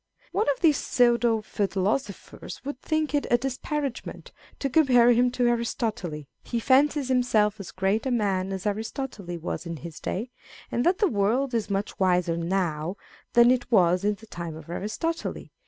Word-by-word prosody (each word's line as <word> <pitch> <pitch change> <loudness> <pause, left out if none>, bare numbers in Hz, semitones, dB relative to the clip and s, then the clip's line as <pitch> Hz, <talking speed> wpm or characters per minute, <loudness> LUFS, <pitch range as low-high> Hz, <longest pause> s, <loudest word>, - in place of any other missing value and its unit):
One 420 - +1
of 280 - -1
these 310 -4 +5
pseudo 235 -2 +2
philosophers 200 +2 -3
would 285 -2 -5
think 310 -1 -1
it 290 - +1
a 240 - +5
disparagement 270 +2 -4 0.3
to 275 - -1
compare 250 -4 +5
him 245 +1 +4
to 250 -1 +1
Aristotle: 230 -5 -1 0.4
lie 235 - +2
fancies 275 +3 +3
himself 220 -5 +2
as 190 -5 -7
great 195 - 0
a - - +1
man 195 -5 0
as 190 0 -5
Aristotle 220 +1 -3
was 170 +1 -5
in 165 -1 -5
his 165 0 -9
day, 230 +7 -4 0.4
and 240 - 0
that 365 +1 +3
the 415 - +3
world 240 - +1
is 225 -3 -1
much 200 +1 -3
wiser 180 -3 +2
now 170 0 -1 0.4
than 240 +1 +7
it 250 -1 -1
was 180 -3 +4
in 210 0 +1
the 220 - -15
time 170 -6 -6
of 160 +1 -10
Aristotle. 225 - -3
225 Hz, 170 wpm, -26 LUFS, 190-255 Hz, 0.4 s, than